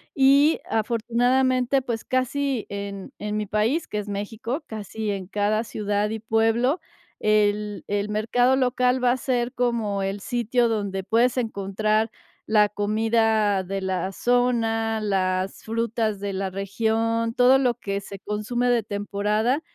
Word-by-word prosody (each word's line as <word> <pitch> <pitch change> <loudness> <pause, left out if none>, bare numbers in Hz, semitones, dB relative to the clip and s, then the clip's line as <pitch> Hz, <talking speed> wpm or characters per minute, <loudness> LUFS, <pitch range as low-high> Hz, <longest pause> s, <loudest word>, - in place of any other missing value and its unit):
Y 280 +3 +5
afortunadamente, 245 +3 +1
pues, 235 -3 -4
casi 255 -1 -1
en 200 -1 -6
en 210 0 -3
mi 210 -1 -2
país, 220 - +1
que 210 - -5
es 210 - -6
México, 220 +7 -4
casi 215 0 -4
en 195 -2 -4
cada 210 +3 0
ciudad 210 -1 -1
y 220 +1 -4
pueblo, 225 - +1 0.4
el 210 -1 +1
el 205 0 0
mercado 230 +5 +2
local 250 -1 +1
va 250 +1 +3
ser 250 -2 -1
como 230 -6 0
el 195 +1 -3
sitio 240 +1 +1
donde 200 -3 -2
puedes 230 +5 +2
encontrar 215 -1 0 0.4
la 210 -1 +4
comida 215 0 +1
de 195 +1 -3
la 190 0 -2
zona, 225 -2 +1
las 190 -2 -1
frutas 225 -2 -1
de 200 0 -2
la 190 0 -2
región, 225 +4 -1
todo 250 +2 +5
lo 255 -3 +2
que 200 -4 -3
se 200 0 -9
consume 215 +4 -1
de 240 -2 +2
temporada 210 +6 -1
220 Hz, 140 wpm, -24 LUFS, 205-245 Hz, 0.4 s, Y